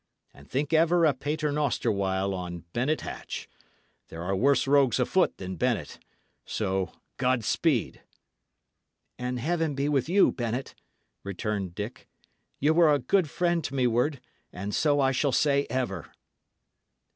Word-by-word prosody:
And 70 Hz, +1 st, -17 dB
think 145 Hz, +3 st, -1 dB
ever 165 Hz, +1 st, +4 dB
a 150 Hz, -, +4 dB
pater 150 Hz, +3 st, -2 dB
noster 145 Hz, -5 st, 0 dB
while 95 Hz, -1 st, 0 dB
on 90 Hz, -2 st, -6 dB
Bennet 135 Hz, +6 st, 0 dB
Hatch. -, -, -6 dB, 0.6 s
There 80 Hz, +1 st, -7 dB
are 95 Hz, +2 st, -1 dB
worse 135 Hz, +7 st, +3 dB
rogues 135 Hz, -2 st, +3 dB
afoot 175 Hz, +9 st, +2 dB
than 95 Hz, 0 st, -6 dB
Bennet. 115 Hz, -, -1 dB, 0.4 s
So, 95 Hz, -3 st, -2 dB, 0.3 s
God 125 Hz, -2 st, +1 dB
speed!" 140 Hz, -5 st, 0 dB, 1.2 s
"And 125 Hz, 0 st, -2 dB
Heaven 160 Hz, +2 st, 0 dB
be 140 Hz, +1 st, 0 dB
with 145 Hz, 0 st, +1 dB
you, 195 Hz, +2 st, +5 dB
Bennet!" 120 Hz, +2 st, -3 dB, 0.5 s
returned 100 Hz, -2 st, -3 dB
Dick. 105 Hz, +4 st, -6 dB, 0.5 s
"Ye 145 Hz, +3 st, +3 dB
were 165 Hz, -1 st, +5 dB
a 145 Hz, -, +4 dB
good 155 Hz, +6 st, +1 dB
friend 170 Hz, 0 st, 0 dB
to 140 Hz, -, -4 dB
me 130 Hz, -2 st, +2 dB
ward, 125 Hz, +4 st, +1 dB, 0.3 s
and 100 Hz, +3 st, -5 dB
so 145 Hz, -2 st, +2 dB
I 135 Hz, -1 st, +3 dB
shall 135 Hz, +2 st, +1 dB
say 140 Hz, +1 st, +2 dB
ever." 115 Hz, -, -3 dB
130 Hz, 145 wpm, -27 LUFS, 105-150 Hz, 1.2 s, you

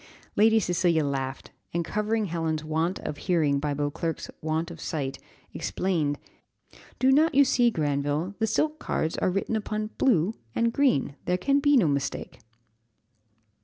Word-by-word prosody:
Lady 220 Hz, +1 st, +5 dB
Cecilia 175 Hz, -4 st, +1 dB
laughed, 135 Hz, -1 st, -3 dB, 0.2 s
and 170 Hz, -1 st, 0 dB
covering 210 Hz, +3 st, 0 dB
Helen's 160 Hz, -3 st, -2 dB
want 160 Hz, +4 st, -1 dB
of 145 Hz, -, -5 dB
hearing 155 Hz, -6 st, +1 dB
by 145 Hz, 0 st, -1 dB
Beauclerc's 145 Hz, +3 st, -3 dB
want 160 Hz, +2 st, -1 dB
of 165 Hz, -1 st, -10 dB
sight, 140 Hz, -5 st, -3 dB, 0.3 s
explained 160 Hz, -6 st, -1 dB, 0.8 s
"Do 260 Hz, +1 st, +4 dB
not 305 Hz, +2 st, +4 dB
you 280 Hz, 0 st, +7 dB
see, 245 Hz, -2 st, +4 dB
Granville, 145 Hz, 0 st, -1 dB
the 220 Hz, -, +1 dB
silk 305 Hz, +8 st, 0 dB
cards 160 Hz, -, -1 dB
are -, -, +2 dB
written 195 Hz, +4 st, -1 dB
upon, 215 Hz, 0 st, -3 dB
'blue' 210 Hz, -6 st, +3 dB, 0.2 s
and 230 Hz, 0 st, +1 dB
'green;' 255 Hz, -, +2 dB
there 180 Hz, 0 st, +1 dB
can 275 Hz, +9 st, +2 dB
be 290 Hz, 0 st, +4 dB
no 210 Hz, -, +4 dB
mistake." 140 Hz, -1 st, -2 dB
175 Hz, 150 wpm, -27 LUFS, 150-220 Hz, 0.8 s, you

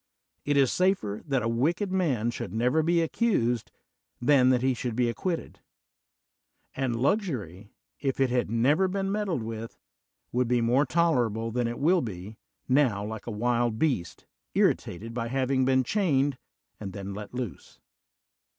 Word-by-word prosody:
It 145 Hz, 0 st, +1 dB
is 135 Hz, -3 st, +4 dB
safer 180 Hz, -, 0 dB
that 135 Hz, -4 st, +1 dB
a -, -, 0 dB
wicked 165 Hz, -, 0 dB
mar 135 Hz, -, +1 dB
should 105 Hz, -4 st, -6 dB
never 125 Hz, +7 st, +2 dB
be 170 Hz, +1 st, +2 dB
accused 125 Hz, -, 0 dB, 0.5 s
than 130 Hz, 0 st, +4 dB
that 125 Hz, -1 st, +2 dB
he 130 Hz, 0 st, +3 dB
should 120 Hz, -1 st, -4 dB
be 120 Hz, 0 st, +2 dB
acquitted; 170 Hz, +8 st, -3 dB, 1.2 s
and 130 Hz, -3 st, -1 dB
luxury, 115 Hz, -, -1 dB, 0.3 s
if 135 Hz, -2 st, -2 dB
it 135 Hz, -2 st, +2 dB
had 125 Hz, -3 st, 0 dB
never 140 Hz, -, +3 dB
beer 195 Hz, +1 st, -2 dB
meddled 195 Hz, -, -1 dB
with, 115 Hz, 0 st, -6 dB, 0.5 s
would 125 Hz, 0 st, +1 dB
be 125 Hz, 0 st, +2 dB
more 125 Hz, +5 st, +2 dB
tolerable 120 Hz, -8 st, +1 dB
than 120 Hz, +1 st, 0 dB
11 120 Hz, +4 st, -5 dB
will 175 Hz, +3 st, +4 dB
be, 105 Hz, -2 st, -7 dB, 0.3 s
now, 125 Hz, -7 st, +2 dB
like 110 Hz, +1 st, -7 dB
a -, -, -3 dB
wild 120 Hz, +1 st, 0 dB
beast, 120 Hz, -, -1 dB, 0.3 s
irritated 110 Hz, +6 st, 0 dB
by 115 Hz, -1 st, -2 dB
hav 130 Hz, +2 st, -1 dB
ing 130 Hz, -1 st, +2 dB
been 130 Hz, 0 st, +3 dB
chained 145 Hz, -, +1 dB, 0.4 s
and 100 Hz, -3 st, -6 dB
then 100 Hz, -1 st, -6 dB
let 105 Hz, +3 st, -8 dB
loose. 125 Hz, -6 st, -6 dB
125 Hz, 160 wpm, -27 LUFS, 115-150 Hz, 1.2 s, is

